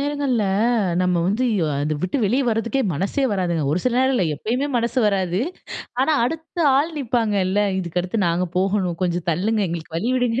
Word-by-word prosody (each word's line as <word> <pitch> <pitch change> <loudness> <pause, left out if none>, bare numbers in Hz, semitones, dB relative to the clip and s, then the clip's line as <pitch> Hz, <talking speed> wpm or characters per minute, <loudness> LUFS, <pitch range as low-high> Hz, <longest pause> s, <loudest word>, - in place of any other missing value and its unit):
நேரங்கள்ள, 280 -5 0 0.6
நம்ம 180 -1 +1
வந்து, 210 +7 0
இ 200 - +1
அதை 145 +2 -1
விட்டு 185 +9 -1
வெளிய 250 +7 +2
வர்றதுக்கே 230 +3 0
மனசே 195 - -1
வராதுங்க. 175 -5 0
ஒரு 170 - +1
சில 250 - +1
நேரம் 260 0 +3
இல்ல, 190 - +2
எப்பயுமே 245 - -2
மனசு 235 +2 0
வராது. 190 -1 0 0.6
ஆனா 290 +4 +3
அடுத்த 325 +5 -5 0.2
ஆள் 310 +4 +1
நிப்பாங்கல்ல, 210 -6 +1 0.2
இதுக்கு 175 -1 -2
அடுத்து 185 +2 -1
நாங்க 175 +2 0
போகணும். 190 -3 0
கொஞ்சம் 175 -1 -2
தள்ளுங்க, 205 +4 0
எங்களுக்கு 165 -1 -5
வழிவிடுங்க. 245 +2 0
210 Hz, 165 wpm, -22 LUFS, 180-250 Hz, 0.6 s, நேரம்